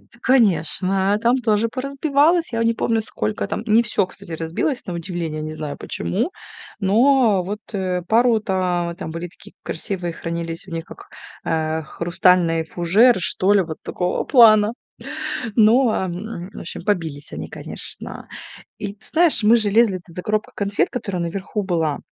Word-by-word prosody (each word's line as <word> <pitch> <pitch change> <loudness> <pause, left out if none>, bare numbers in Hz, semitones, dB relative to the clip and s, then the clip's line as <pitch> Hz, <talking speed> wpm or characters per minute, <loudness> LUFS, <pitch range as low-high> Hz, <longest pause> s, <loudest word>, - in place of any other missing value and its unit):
Да, - - -27 0.2
конечно, 195 -4 +2
там 240 +3 +3
тоже 225 -2 +1
поразбивалось, 280 +5 +1
я 230 0 0
не 230 0 +3
помню, 225 0 0
сколько 105 - -3
там - - -3
Не 220 +2 +5
всё, 210 -4 0
кстати, 170 - -14
разбилось, 165 - -2
на 180 - -4
удивление, 170 -2 -4
не 155 0 -5
знаю 150 -2 -5
почему. 235 - -2 0.5
Но 220 0 +4
вот, 205 +4 -5
э, 185 -2 -1
пару 230 +1 +4
там 180 -4 -1
там 160 - -6
были 165 +2 -5
такие - - -16
красивые, 175 0 -3
хранились 165 +2 -5
у - - -10
них 165 -1 -4
как, - - -13 0.4
э, 160 0 -1
хрустальный 170 0 +2
фужер, 190 +9 +4
что 185 +2 +2
ли, 200 -2 +4
вот 160 -2 -7
такого 180 0 -2
плана. 220 -4 +6 0.8
Ну, 235 +4 +5
а, 190 -3 -1
в 185 +1 -7
общем, 170 - -6
побились 165 -8 -2
они, - - -6
конечно. - - -8 0.5
И 205 -2 -5
ты 210 - -24
знаешь, 320 -7 +4
мы 225 +3 +6
же 215 -3 +1
лезли-то 195 -5 +2
за 180 - -6
коробкой 215 0 -1
конфет, 200 0 0
которая 195 -7 -3
наверху 195 +4 -3
была, 165 -5 -1
195 Hz, 160 wpm, -21 LUFS, 170-225 Hz, 0.8 s, плана